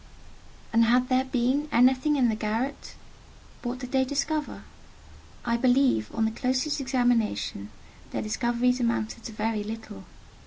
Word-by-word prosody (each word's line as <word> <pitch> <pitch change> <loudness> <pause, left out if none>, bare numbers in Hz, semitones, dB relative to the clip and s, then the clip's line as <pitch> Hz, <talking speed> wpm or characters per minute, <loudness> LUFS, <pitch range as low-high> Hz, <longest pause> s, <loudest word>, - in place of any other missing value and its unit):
And 230 0 +5
had 250 +2 +3
there 260 0 +2
been 260 +4 0
anything 260 +4 +4
in 260 -4 +3
the 225 - +1
garret? 225 +6 -3 0.7
What 245 0 -3
did 250 -1 -8
they 265 -1 +3
discover? 290 +3 -2 0.8
I 235 -1 +1
believe, 250 - +3
on 225 -1 +1
the 220 - 0
closest 260 +5 -1
examination, 245 - 0 0.4
their - - -3
discoveries 240 +3 0
amounted 235 -1 -1
to - - -5
very 215 0 -2
little. 215 - -8
245 Hz, 140 wpm, -27 LUFS, 225-260 Hz, 0.8 s, And